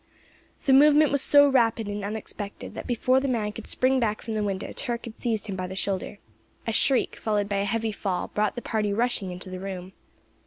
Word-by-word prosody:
The 270 - +4
movement 295 +2 +6
was 280 -1 +3
so 285 +1 +6
rapid 230 -5 +2
and 205 0 -4
unexpected, 205 -1 -6
that - - -7
before 255 +2 +2
the 275 - -2
man 220 -5 -1
could 220 +1 -9
spring 260 +1 +2
back 215 -3 -1
from 225 - -4
the 215 - -1
window 195 -2 -3
Turk 240 -1 -3
had 230 -2 -10
seized 225 -3 -1
him 200 -3 -4
by 185 -1 -3
the 190 - -7
shoulder. 195 +1 -3 0.5
A 225 - -1
shriek, 260 +3 +2
followed 210 -2 0
by 200 -1 -1
a 200 - 0
heavy 225 +1 -1
fall, 195 -3 -3
brought 210 0 0
the 245 - -6
party 215 -2 -1
rushing 230 -2 0
into 180 +1 -8
the 185 - -5
room. 190 -1 -6
215 Hz, 220 wpm, -26 LUFS, 200-245 Hz, 0.5 s, movement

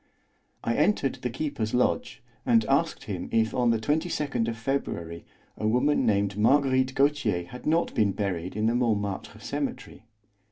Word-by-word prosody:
I 115 - 0
entered 150 -3 +1
the 125 - -1
keeper's 125 -4 -3
lodge, 125 - 0 0.2
and 115 -2 +3
asked 140 +6 +1
him 90 -4 -5
if 110 -1 +2
on 125 -2 +2
the 115 - +3
22nd 145 -1 -1
of 115 0 -3
February 85 -10 -3 0.3
a 110 - -2
woman 125 +6 +2
named 100 -1 +1
Marguerite 130 +2 +3
Gautier 135 -11 +1
had 125 +11 -9
not 165 +2 +2
been 105 -4 +2
buried 95 -3 -3
in 110 0 0
the 115 - +3
Montmartre 105 -5 -1
Cemetery. - - -5
115 Hz, 155 wpm, -27 LUFS, 105-135 Hz, 0.3 s, and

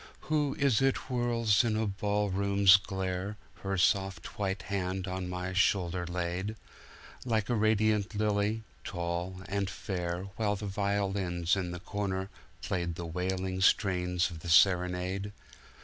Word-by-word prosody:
Who 150 -3 0
is 135 -5 +2
it 135 0 +3
whirls 120 -4 +1
in 115 -2 +1
a 110 - +1
ball 105 0 -1
room's 100 0 +5
glare, 95 +1 -3 0.2
Her 95 0 -2
soft 95 -1 0
white 95 -1 -1
hand 95 0 -2
on 90 -1 -3
my 90 +1 -3
shoulder 90 -2 +1
laid, 90 +4 -2 0.7
Like 110 -3 0
a - - +2
radiant 110 -1 +2
lily, 105 +1 0 0.2
tall 85 +2 -3
and 100 0 -1
fair, 90 -3 -3
While 105 -2 +1
the 105 +1 -6
violins 95 -3 0
in 95 -2 -2
the 90 0 -5
corner 95 -1 -3 0.3
playedThe 85 -2 -3
wailing 95 +1 -2
strains 90 -2 +2
of 80 - -8
the 85 - -7
Serenade? 90 +3 +3
95 Hz, 135 wpm, -30 LUFS, 90-105 Hz, 0.7 s, room's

